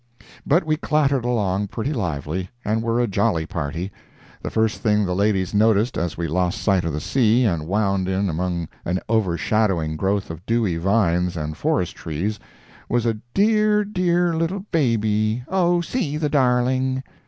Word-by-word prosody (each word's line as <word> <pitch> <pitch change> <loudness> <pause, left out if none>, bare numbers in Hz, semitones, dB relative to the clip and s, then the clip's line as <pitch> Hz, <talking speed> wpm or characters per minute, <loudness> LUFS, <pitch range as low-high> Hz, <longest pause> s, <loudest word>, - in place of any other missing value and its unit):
But 170 +6 +4
we 155 0 +1
clattered 140 -5 +1
along 105 -5 0
pretty 125 +9 -3
lively, 85 - -3 0.2
and 110 +2 0
were 115 +1 0
a 120 - +3
jolly 100 -5 0
party. 85 +3 -4 0.5
The - - -4
first 110 -1 0
thing 105 -2 +2
the 90 - -1
ladies 95 -1 +1
noticed 110 +2 +3
as 85 0 -2
we 85 0 -2
lost 90 +5 0
sight 95 -3 +2
of 85 - -1
the 75 - -2
sea, 120 - +2
and 85 -8 0
wound 100 -1 0
in 95 +1 0
among 85 0 -2 0.2
an 90 +2 -1
overshadowing 95 -5 +1
growth 95 +1 -1
of 80 +2 -9
dewy 110 -7 +1
vines 90 -2 +1
and 75 0 -4
forest - - -1
trees, 95 +7 -3 0.5
was 120 0 +1
a 115 -2 0 0.2
"dear, 210 0 +3
dear 180 -3 +1
little 180 +4 -2
baby—oh, 120 - +1
see 170 - -2
the 150 -1 -1
darling!" 130 -1 +1
110 Hz, 160 wpm, -22 LUFS, 90-130 Hz, 0.5 s, But